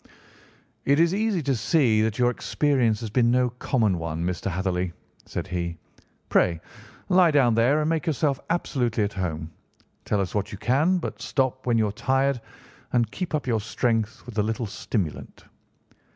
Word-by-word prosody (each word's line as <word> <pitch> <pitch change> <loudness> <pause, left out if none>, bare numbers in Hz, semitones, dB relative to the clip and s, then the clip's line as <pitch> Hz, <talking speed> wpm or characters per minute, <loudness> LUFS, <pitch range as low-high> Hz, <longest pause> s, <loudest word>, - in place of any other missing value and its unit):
"It 140 +2 +3
is 170 +1 +4
easy 205 -4 0
to 135 -1 +1
see 115 -2 +3
that 110 -1 0
your 125 0 +3
experience 125 -5 +1
has 110 -3 -5
been 120 0 +3
no 125 0 +2
common 115 -6 0
one, 80 0 -3
Mr. 90 +1 -2
Hatherley," 90 0 -1 0.3
said - - -4
he. 85 -3 -3 0.5
"Pray, 85 -3 +2 0.5
lie 180 -2 +6
down 135 -6 +4
there 120 +7 +3
and 150 - 0
make 165 +1 -1
yourself 145 -2 +1
absolutely 125 -9 0
at 100 - -2
home. 80 -4 -3 0.5
Tell 105 - 0
us 95 -2 -2
what 105 0 -2
you 105 - -6
can, 145 - +2
but 175 - -5
stop 130 -1 -1
when 120 -2 +3
you 110 - +3
are - - -2
tired 130 +3 +1 0.5
and 120 -3 +2
keep 180 -4 -3
up 150 - -2
your 115 -4 0
strength 115 +2 -1
with 115 -3 -5
a - - +3
little 110 +2 -2
stimulant." 100 -4 -4
120 Hz, 175 wpm, -25 LUFS, 100-140 Hz, 0.5 s, lie